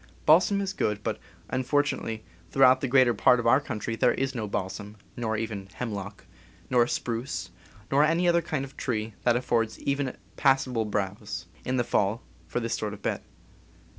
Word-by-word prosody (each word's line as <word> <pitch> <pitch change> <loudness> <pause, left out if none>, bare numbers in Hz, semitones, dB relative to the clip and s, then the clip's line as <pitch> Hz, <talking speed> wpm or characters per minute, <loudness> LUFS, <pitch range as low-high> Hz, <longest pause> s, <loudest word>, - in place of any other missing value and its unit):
Balsam 185 +6 +5
is 195 -1 -2
good; 105 0 -1
but, - - -2 0.3
unfortunately, 130 -4 0 0.3
throughout 130 -1 +5
the 135 - 0
greater 130 -1 +5
part 125 +3 +4
of 120 - -3
our 130 +4 +5
country 115 -4 -4
there 125 +2 +3
is 135 0 -1
no 110 -4 -3
balsam, 100 +2 -4 0.2
nor 110 -2 -1
even 105 -3 -4
hemlock, 100 -4 -5 0.5
nor 120 -1 +4
spruce, 120 +2 -3 0.4
nor 140 +2 +5
any 165 +3 +2
other 170 0 +4
kind 155 -4 -2
of 140 +1 -14
tree 110 -3 -2
that 120 -1 +4
affords 115 -2 0
even 140 -2 -1 0.2
passable 135 -4 +2
browse, 100 -1 -3 0.2
in 130 +1 -1
the 120 - +2
fall, 110 -1 0 0.2
for - - -2
this 115 -1 -2
sort 105 -1 -2
of 100 - -18
bed. - - -1
120 Hz, 170 wpm, -27 LUFS, 110-135 Hz, 0.5 s, Balsam